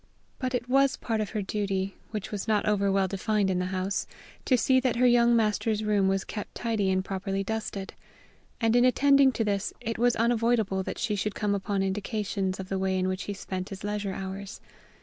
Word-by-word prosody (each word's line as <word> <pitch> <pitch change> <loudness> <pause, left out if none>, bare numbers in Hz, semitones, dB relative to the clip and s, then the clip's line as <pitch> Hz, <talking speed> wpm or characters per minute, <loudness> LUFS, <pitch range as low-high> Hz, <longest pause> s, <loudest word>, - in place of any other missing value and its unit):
But 255 -1 -1
it 245 0 -2
was 275 +1 +3
part 225 -2 -1
of 210 - -3
her 215 -2 -2
duty, 195 -1 -2 0.2
which 215 -2 -5
was 205 0 -4
not 215 -2 +2
over 200 -2 +2
well 195 -1 +2
defined 200 +1 0
in 180 - 0
the 180 - -1
house, 185 +1 -2 0.4
to 255 - +4
see 260 +2 +4
that 255 -2 0
her 250 +2 +3
young 240 -1 +5
master's 215 -1 +1
room 205 -2 +2
was 195 0 +1
kept 210 - -7
tidy 220 -5 0
and 185 0 +1
properly 195 0 -2
dusted; 210 -2 -4 0.7
and 225 -1 +2
in 245 - +5
attending 275 +1 +5
to 225 - 0
this 205 -1 -1
it 225 0 -4
was 245 0 +3
unavoidable 230 -4 +1
that - - -5
she 225 -3 -1
should 205 +1 -2
come 210 -1 0
upon 195 0 -1
indications 195 -1 -2
of 190 - -5
the 195 0 -2
way 190 0 0
in 185 0 0
which 185 +1 -3
he 205 - -3
spent 185 -1 -5
his 195 -1 -8
leisure 205 -1 -2
hours. 195 +2 -6
205 Hz, 210 wpm, -28 LUFS, 195-230 Hz, 0.7 s, young